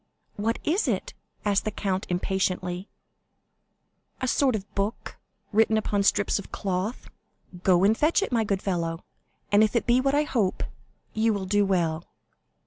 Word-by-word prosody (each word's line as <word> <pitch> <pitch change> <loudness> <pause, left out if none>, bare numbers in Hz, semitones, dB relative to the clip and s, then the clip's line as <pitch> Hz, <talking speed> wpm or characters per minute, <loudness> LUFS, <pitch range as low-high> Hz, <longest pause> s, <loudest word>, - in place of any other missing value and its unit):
"What 225 +3 -1
is 360 +8 +1
it?" - - -1 0.3
asked 200 -1 +2
the - - -1
count, 195 -2 -2
impatiently. 185 0 -1 1.3
"A 255 - -1
sort 260 -1 +2
of 200 -1 -6
book, 200 +3 -3 0.3
written 220 +1 +3
upon 205 -2 0
strips 200 +1 +2
of 200 - -10
cloth." 195 +4 -3 0.5
"Go 180 -1 +4
and 210 +3 +5
fetch 315 - +2
it, - - -4
my 230 -2 +2
good 195 -2 -1
fellow; 170 -3 -2 0.5
and 205 +1 +6
if 215 +2 +1
it 235 - +2
be 245 +1 +4
what 275 +1 +1
I 295 - +3
hope, 225 -10 0 0.5
you 220 +1 +2
will 195 -2 -3
do 205 +1 +2
well." 170 -4 0
205 Hz, 160 wpm, -26 LUFS, 190-225 Hz, 1.3 s, and